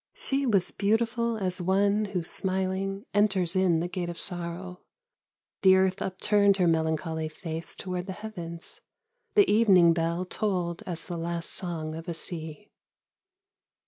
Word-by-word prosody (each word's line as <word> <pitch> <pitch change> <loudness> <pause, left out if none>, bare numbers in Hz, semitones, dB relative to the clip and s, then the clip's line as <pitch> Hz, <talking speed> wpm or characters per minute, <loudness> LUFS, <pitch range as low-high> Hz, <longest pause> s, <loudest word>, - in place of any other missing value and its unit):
She 275 0 -1
was 195 -6 +2
beautiful 230 +2 +1
as 185 -3 -2
one 200 +3 +2
Who 190 -4 -2
smiling, 190 +3 -2
enters 195 -3 +2
in 180 -3 +3
the 175 - -1
gate 175 -1 -3
of 170 -1 -6
Sorrow: 180 0 -4 0.8
The 190 -1 +7
earth 190 0 +2
upturned 200 +1 +3
her 180 - +3
melancholy 160 0 0
face 160 0 -6
Toward 180 0 -4
the 190 - -3
heavens 175 -5 -7 0.5
the 410 -1 +6
evening 190 -6 +6
bell 170 +2 -1
Tolled 180 -3 -2
as 170 -3 -5
the 175 - -5
last 170 0 -3
song 165 -4 -4
of 165 +2 -7
a 170 - -3
sea. 160 +3 -7
185 Hz, 145 wpm, -28 LUFS, 170-200 Hz, 0.8 s, The